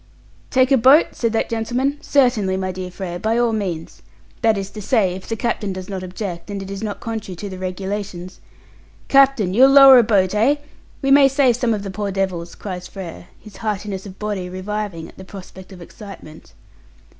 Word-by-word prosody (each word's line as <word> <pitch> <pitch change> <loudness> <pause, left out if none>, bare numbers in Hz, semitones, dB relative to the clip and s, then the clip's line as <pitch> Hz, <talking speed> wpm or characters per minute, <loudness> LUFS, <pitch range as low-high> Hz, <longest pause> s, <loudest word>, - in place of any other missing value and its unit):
"Take 260 +1 +2
a 270 - +6
boat?" 270 +7 +6
said 230 -2 -2
that 225 - 0
gentleman. 245 +5 -1
"Certainly, 235 -9 +2
my 185 0 -2
dear 185 0 -6
Frere, 180 -1 -6
by 220 +4 0
all 240 -1 +2
means. 180 -7 -4 0.4
That 225 -2 +3
is 195 0 -5
to 210 - -8
say, 200 -4 +1
if 185 +1 -9
the 225 - -1
captain 215 -3 -2
does 185 0 -8
not 190 -2 -4
object, 185 0 -6
and 200 -1 -4
it 195 0 -7
is 195 0 -6
not 210 -2 -4
contrary 220 -5 -5
to 200 +4 -7
the 185 -1 -8
Regulations." 185 -1 -5 0.7
"Captain, 270 -9 +4
you'll 260 +6 +6
lower 275 -2 +9
a - - +5
boat, 200 -4 +2
eh? 230 +7 +3 0.5
We 270 - +2
may 275 0 +7
save 270 -3 +3
some 245 -2 0
of 210 -2 -1
the 195 - -5
poor 205 +1 -3
devils," 185 -3 -3
cries 180 -3 -7
Frere, 170 - -9
his 205 -3 -14
heartiness 205 -2 -4
of 190 - -11
body 205 -4 -4
reviving 185 -2 -5
at - - -17
the - - -8
prospect 190 0 -12
of 180 -2 -11
excitement. 195 -5 -13
200 Hz, 200 wpm, -20 LUFS, 185-230 Hz, 0.7 s, lower